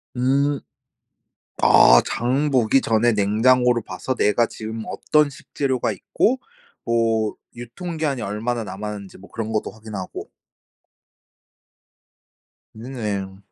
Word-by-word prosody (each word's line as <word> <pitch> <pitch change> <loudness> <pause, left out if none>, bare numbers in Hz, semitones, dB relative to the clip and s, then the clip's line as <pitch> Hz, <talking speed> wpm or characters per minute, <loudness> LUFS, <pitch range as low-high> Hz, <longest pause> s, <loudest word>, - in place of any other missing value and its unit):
음. 140 +3 +1 1.0
아 - - +7
장 130 +6 0
보기 130 +1 +3
전에 115 +1 +2
냉장고를 120 +4 +3
봐서 130 - -4
내가 115 +2 +3
지금 110 0 -7
어떤 150 -1 +2
식재료가 130 -5 -2
있고 235 - 0 0.5
뭐 115 -2 +1 0.2
유통기한이 140 +2 -4
얼마나 115 +4 -2
남았는지 105 -1 -7
뭐 100 - -14
그런 110 -1 -4
것도 110 - -2
확인하고. 110 -4 -8 2.5
음 110 - -11
네. 100 -5 -4
115 Hz, 215 characters per minute, -22 LUFS, 105-130 Hz, 2.5 s, 아